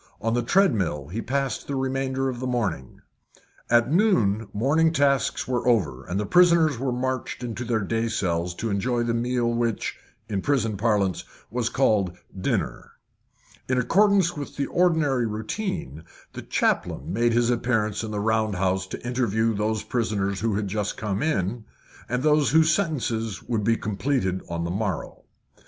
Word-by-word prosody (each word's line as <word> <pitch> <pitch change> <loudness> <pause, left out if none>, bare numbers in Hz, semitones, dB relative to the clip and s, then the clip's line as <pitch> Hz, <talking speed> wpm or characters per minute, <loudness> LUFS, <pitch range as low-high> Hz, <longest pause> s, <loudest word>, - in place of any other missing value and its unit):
On 115 0 -1
the 120 - +2
treadmill 105 - +1
he 110 +6 -3
passed 135 +2 -2
the 140 - -2
remainder 135 0 -1
of 125 -2 -3
the 130 - -3
morning. 100 - -2 0.7
At 120 +2 +4
noon 115 - +2
morning 150 +9 +2
tasks 140 -4 +1
were 125 -1 -1
over, 75 - +1
and 95 +3 -2
the 105 - -1
prisoners 165 - +4
were 130 0 -1
marched 130 0 -3
into 120 0 -4
their 115 -2 0
day 115 +3 -1
cells 90 -5 -1
to 115 +3 -3
enjoy 120 +4 0
the 120 0 0
meal 120 0 0
which, 115 -2 -1 0.3
in 100 -2 -2
prison 115 -6 0
parlance, 100 -4 +1 0.3
was 120 0 -1
called 105 -9 +1 0.2
dinner. 95 - -2 0.8
In 130 - +2
accordance 190 - +3
with 145 -2 -6
the 140 - -1
ordinary 155 -9 +2
routine, 110 - -4 0.3
the - - -6
chaplain - - -1
made 120 +2 +2
his 120 +1 +3
appearance 115 -3 0
in 110 - -4
the 105 -1 -3
round 110 -1 +1
house 95 0 0
to 120 - -7
interview 115 -2 +1
those 105 +1 -1
prisoners 100 -5 -1
who 110 -1 0
had 105 0 -1
just 105 +1 -2
come 105 -2 -2
in, 115 - -1 0.5
and 125 +1 -1
those 150 -1 +4
whose 160 +1 +4
sentences 120 - -1
would 110 -3 -1
be 115 +2 +2
completed 100 -3 -1
on 85 0 -2
the 85 - -2
morrow. 100 -2 -3
115 Hz, 165 wpm, -25 LUFS, 105-130 Hz, 0.8 s, At